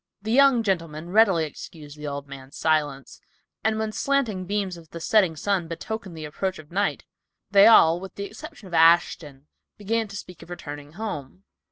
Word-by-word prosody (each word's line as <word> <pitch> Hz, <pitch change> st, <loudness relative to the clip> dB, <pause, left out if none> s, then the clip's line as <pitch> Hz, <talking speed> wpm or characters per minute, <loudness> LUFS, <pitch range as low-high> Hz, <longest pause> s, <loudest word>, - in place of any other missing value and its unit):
The 220 Hz, -, -3 dB
young 265 Hz, -2 st, +5 dB
gentlemen 170 Hz, -4 st, -2 dB
readily 195 Hz, -6 st, +4 dB
excused 150 Hz, 0 st, -10 dB
the 150 Hz, 0 st, -7 dB
old 140 Hz, 0 st, -5 dB
man's 135 Hz, 0 st, -11 dB
silence, 145 Hz, -4 st, -1 dB, 0.4 s
and 220 Hz, 0 st, +1 dB
when 220 Hz, 0 st, -1 dB
the -, -, -13 dB
slanting 245 Hz, -10 st, 0 dB
beams 200 Hz, -2 st, -2 dB
of 165 Hz, -2 st, -14 dB
the 170 Hz, -, -8 dB
setting 185 Hz, -2 st, +2 dB
sun 185 Hz, +1 st, -1 dB
betokened 190 Hz, +1 st, -6 dB
the 155 Hz, -, -6 dB
approach 185 Hz, +5 st, -3 dB
of 155 Hz, 0 st, -14 dB
night, 200 Hz, +3 st, -1 dB, 0.5 s
they 200 Hz, -1 st, +7 dB
all, 170 Hz, -7 st, +6 dB
with 190 Hz, +1 st, -10 dB
the 200 Hz, -, -5 dB
exception 285 Hz, -, -10 dB
of 175 Hz, -, -13 dB
Ashton, 160 Hz, -4 st, +3 dB, 0.3 s
began 225 Hz, +2 st, -1 dB
to 200 Hz, -, -10 dB
speak 180 Hz, -2 st, -10 dB
of -, -, -13 dB
returning 145 Hz, -4 st, -8 dB
home. 185 Hz, -4 st, -6 dB
175 Hz, 185 wpm, -24 LUFS, 155-210 Hz, 0.5 s, they